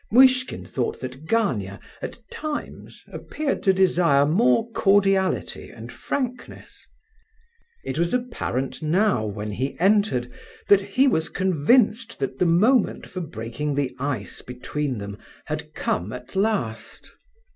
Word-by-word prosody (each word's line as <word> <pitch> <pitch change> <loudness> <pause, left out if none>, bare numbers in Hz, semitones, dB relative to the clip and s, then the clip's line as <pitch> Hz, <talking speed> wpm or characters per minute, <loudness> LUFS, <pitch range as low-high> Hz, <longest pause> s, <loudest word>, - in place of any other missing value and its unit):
Muishkin 255 +2 +4
thought 125 -3 -3
that 130 +4 -8
Gania 110 - 0 0.2
at - - -6
times 305 -1 -6
appeared 300 -2 -3
to 195 - +4
desire 175 -7 +4
more 225 +7 +2
cordiality 195 -2 +2
and - - -10
frankness. 255 -3 -5 1.0
It 135 +4 -3
was 170 0 +1
apparent 235 - -2
now, 175 - +2
when 105 0 -4
he 130 +9 -3
entered, 190 - +2 0.4
that 200 -1 +7
he 205 +8 +2
was 160 -11 +1
convinced 210 - +2
that 135 -1 -4
the 180 - +3
moment 210 +8 +3
for 185 - -6
breaking 140 +1 -4
the 140 -2 -1
ice 135 -6 -3
between 130 +2 -4
them 100 0 -7 0.3
had - - -5
come 95 +5 -1
at 125 +5 -10
last. 195 - -2
170 Hz, 125 wpm, -24 LUFS, 130-215 Hz, 1.0 s, that